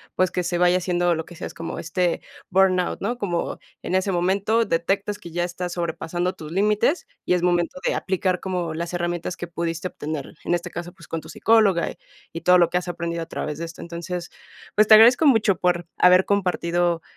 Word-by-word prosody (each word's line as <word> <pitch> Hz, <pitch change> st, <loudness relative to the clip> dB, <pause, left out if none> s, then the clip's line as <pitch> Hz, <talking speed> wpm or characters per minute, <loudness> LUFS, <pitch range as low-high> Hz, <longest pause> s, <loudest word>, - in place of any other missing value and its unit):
pues, 185 Hz, -1 st, +2 dB
que 180 Hz, -, -1 dB
se 175 Hz, 0 st, -1 dB
vaya 180 Hz, +1 st, +4 dB
haciendo 175 Hz, -1 st, +1 dB
lo 160 Hz, -1 st, -3 dB
que 175 Hz, -, -13 dB
decías, -, -, -7 dB
como, 165 Hz, -, -6 dB
este, 175 Hz, 0 st, -1 dB, 0.3 s
burnout, 185 Hz, -1 st, +2 dB
¿no? 240 Hz, +5 st, -3 dB
Como 175 Hz, -6 st, -2 dB, 0.2 s
en -, -, -4 dB
ese 190 Hz, +1 st, +1 dB
momento 195 Hz, +6 st, +1 dB
detectas 200 Hz, +3 st, -1 dB
que 175 Hz, -, -10 dB
ya 175 Hz, +1 st, -1 dB
estás 175 Hz, 0 st, -4 dB
sobrepasando 175 Hz, +1 st, -2 dB
tus 155 Hz, -1 st, -10 dB
límites 210 Hz, -, +1 dB, 0.2 s
y 180 Hz, -, +2 dB
es 175 Hz, -, -1 dB
momento 175 Hz, 0 st, +1 dB
de -, -, +2 dB
aplicar 185 Hz, -1 st, -1 dB
como 180 Hz, -3 st, -3 dB
las 170 Hz, +1 st, -4 dB
herramientas 175 Hz, 0 st, -3 dB
que -, -, -5 dB
pudiste 170 Hz, +1 st, -3 dB
obtener, 150 Hz, -4 st, -6 dB
en -, -, +1 dB
este 170 Hz, -, -5 dB
caso, 175 Hz, +1 st, -6 dB
pues, 175 Hz, -3 st, -16 dB
con 165 Hz, -, -4 dB
tu -, -, -13 dB
psicóloga 215 Hz, -6 st, +3 dB
y -, -, -14 dB, 0.4 s
y 165 Hz, -, -5 dB
todo 180 Hz, 0 st, +5 dB
lo 170 Hz, -1 st, +3 dB
que 180 Hz, -, +2 dB
has 180 Hz, -, -9 dB
aprendido 170 Hz, -1 st, -3 dB
a 165 Hz, -, -5 dB
través 150 Hz, -2 st, -4 dB
de 170 Hz, -, -3 dB
esto. 165 Hz, 0 st, -9 dB
Entonces, 170 Hz, +1 st, -6 dB, 0.4 s
pues, 215 Hz, 0 st, +4 dB
te 215 Hz, -, +10 dB
agradezco 245 Hz, +7 st, +7 dB
mucho 220 Hz, -7 st, +4 dB
por 175 Hz, -1 st, +1 dB
haber 180 Hz, +1 st, +6 dB
compartido, 175 Hz, -3 st, 0 dB
175 Hz, 210 wpm, -23 LUFS, 170-190 Hz, 0.4 s, te